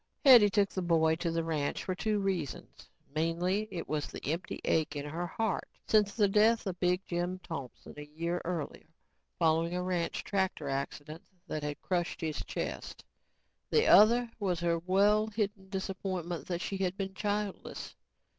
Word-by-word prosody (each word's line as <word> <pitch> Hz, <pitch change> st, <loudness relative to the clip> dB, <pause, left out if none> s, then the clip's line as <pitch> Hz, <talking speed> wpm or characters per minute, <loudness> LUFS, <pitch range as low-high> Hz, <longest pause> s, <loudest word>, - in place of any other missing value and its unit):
Hetty 240 Hz, -6 st, +9 dB
took 200 Hz, 0 st, +2 dB
the 190 Hz, -, -2 dB
boy 165 Hz, -2 st, +3 dB
to 170 Hz, 0 st, -1 dB
the 165 Hz, 0 st, -1 dB
ranch 155 Hz, -3 st, -1 dB
for 185 Hz, -, -2 dB
two 215 Hz, +3 st, 0 dB
reasons. 185 Hz, -, -3 dB, 0.2 s
Mainly 175 Hz, +6 st, 0 dB
it 175 Hz, -4 st, -5 dB
was 150 Hz, -1 st, -2 dB
the -, -, -4 dB
empty 170 Hz, +3 st, -4 dB
ache 155 Hz, -2 st, +1 dB
in 145 Hz, 0 st, -4 dB
her 165 Hz, +4 st, -3 dB
heart 220 Hz, +2 st, -2 dB, 0.2 s
since 210 Hz, -2 st, +3 dB
the 210 Hz, -3 st, +4 dB
death 220 Hz, +3 st, +4 dB
of 185 Hz, -3 st, -4 dB
Big 180 Hz, +1 st, +1 dB
Jim 175 Hz, +1 st, -2 dB
Thompson 140 Hz, -7 st, -7 dB
a 150 Hz, -, -8 dB, 0.2 s
year 170 Hz, +1 st, -1 dB
earlier 165 Hz, -3 st, -4 dB, 0.5 s
following 165 Hz, +1 st, +2 dB
a 180 Hz, -, -1 dB
ranch 180 Hz, -2 st, -1 dB
tractor 190 Hz, -7 st, -1 dB
accident 145 Hz, +3 st, -4 dB, 0.2 s
that 155 Hz, -4 st, -4 dB
had 145 Hz, 0 st, -4 dB
crushed 175 Hz, -2 st, -1 dB
his 155 Hz, -2 st, -3 dB
chest. -, -, -5 dB, 0.6 s
The 450 Hz, +1 st, +3 dB
other 235 Hz, +2 st, +6 dB
was 185 Hz, -5 st, 0 dB
her 170 Hz, -1 st, +1 dB
well 200 Hz, +5 st, +3 dB
hidden 205 Hz, -3 st, -3 dB
disappointment 185 Hz, -4 st, -4 dB
that 175 Hz, -1 st, -2 dB
she 195 Hz, -, -3 dB
had 190 Hz, 0 st, -1 dB
been 195 Hz, -2 st, -3 dB
childless. 205 Hz, 0 st, -3 dB
180 Hz, 165 wpm, -31 LUFS, 165-200 Hz, 0.6 s, Hetty